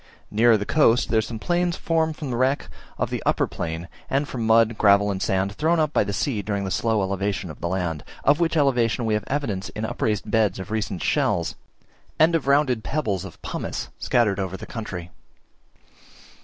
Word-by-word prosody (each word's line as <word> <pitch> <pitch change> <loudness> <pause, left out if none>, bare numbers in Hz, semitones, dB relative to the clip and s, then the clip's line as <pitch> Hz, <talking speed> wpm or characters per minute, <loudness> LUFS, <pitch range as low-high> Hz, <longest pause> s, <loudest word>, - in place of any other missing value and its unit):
Nearer 115 +1 +5
the 105 - -4
coast 125 -5 +3
there 110 - +3
are - - +3
some 115 +1 -6
plains 175 +7 0
formed 160 -1 0
from 145 -4 -5
the - - -1
wreck 130 +3 +1 0.3
of - - -2
the - - -2
upper - - +2
plain, 80 +1 -5 0.2
and 140 +2 0
from 115 -5 -3
mud, 115 0 +4
gravel, 100 -1 +4
and 95 -1 -4
sand 95 0 0
thrown 160 +10 +1
up 155 -1 +1
by - - +3
the 100 - -4
sea 105 +2 -1
during 100 0 -2
the 95 - -3
slow 110 -2 +1
elevation 95 -2 -2
of - - -13
the 85 - -1
land, 85 -4 -2 0.2
of 145 +1 +4
which 165 -1 +1
elevation 125 -5 +2
we 110 - +1
have 105 - 0
evidence 120 -10 -2
in 110 - -4
upraised 105 -1 -2
beds 105 -4 +2
of 95 +1 -7
recent 105 -5 -2
shells, - - +1 0.6
and 160 +2 +5
in 165 - +2
rounded 135 -5 +2
pebbles 105 - -1
of - - -10
pumice - - -4
scattered 105 -5 +2
over 95 -1 -3
the - - -8
country. 90 -6 -6
110 Hz, 200 wpm, -24 LUFS, 100-140 Hz, 0.6 s, Nearer